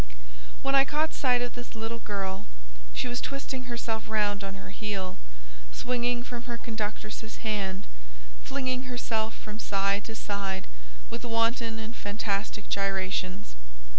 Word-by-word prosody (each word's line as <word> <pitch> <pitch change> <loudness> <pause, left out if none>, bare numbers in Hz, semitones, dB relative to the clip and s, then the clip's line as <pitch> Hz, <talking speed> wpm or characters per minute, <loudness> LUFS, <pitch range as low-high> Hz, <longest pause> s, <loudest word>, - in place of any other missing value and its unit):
When 275 - +3
I 275 0 +9
caught 300 +3 +2
sight 250 -2 +4
of 245 - -2
this 245 -1 -7
little 225 +1 -2
girl, 195 -3 -2 0.4
she - - 0
was 245 0 0
twisting 270 -2 -2
herself 230 -3 -1
round 205 -2 +3
on 195 0 -3
her 195 - -7
heel, 195 -4 -1 0.5
swinging 245 - +1
from 245 -1 -5
her 235 - -1
conductress's 220 0 -3
hand, 195 -3 +1 0.6
flinging 255 -1 0
herself 225 -3 +1
from 215 0 -6
side 200 0 +3
to 225 - -4
side 200 -3 -1 0.5
with - - -3
wanton 230 0 +3
and 220 +1 -4
fantastic 205 0 0
gyrations. 190 - +1
220 Hz, 135 wpm, -31 LUFS, 200-245 Hz, 0.6 s, I